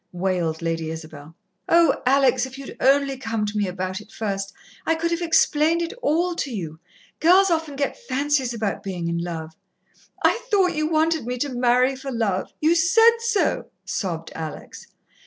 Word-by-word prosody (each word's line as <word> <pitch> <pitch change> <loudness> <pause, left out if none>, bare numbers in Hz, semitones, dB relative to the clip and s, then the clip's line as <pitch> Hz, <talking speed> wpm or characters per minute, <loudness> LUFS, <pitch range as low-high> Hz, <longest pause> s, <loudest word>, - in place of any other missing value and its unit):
wailed 175 -3 -1
Lady 165 -1 -2
Isabel. 155 -1 -9 0.3
"Oh, 335 0 +4
Alex, 260 -1 +3
if 260 +1 -11
you'd 275 -1 -9
only 275 0 +3
come 225 -4 -2
to 210 +1 -5
me 205 -2 +1
about 185 +2 -4
it 210 - -17
first 195 -2 -3 0.3
I 325 - +1
could 335 +1 -1
have 335 +1 -1
explained 330 0 +3
it 335 - -4
all 350 -2 +1
to 285 - -2
you 165 -9 -6 0.4
girls 370 +3 +5
often 320 -3 -1
get 280 0 -1
fancies 275 -1 +1
about 220 -4 -2
being 185 -4 -4
in 170 0 -1
love." 165 -2 -5 0.7
"I 465 - +3
thought 380 -5 +3
you 310 -1 0
wanted 315 -4 +1
me 250 0 -2
to 285 +4 -1
marry 250 +2 +3
for 270 +1 -6
love. 215 -6 -1
You 315 +2 +3
said 450 +8 +5
so," 465 -3 0 0.2
sobbed 165 -5 -3
Alex. 160 -1 -8
255 Hz, 175 wpm, -23 LUFS, -, 0.7 s, girls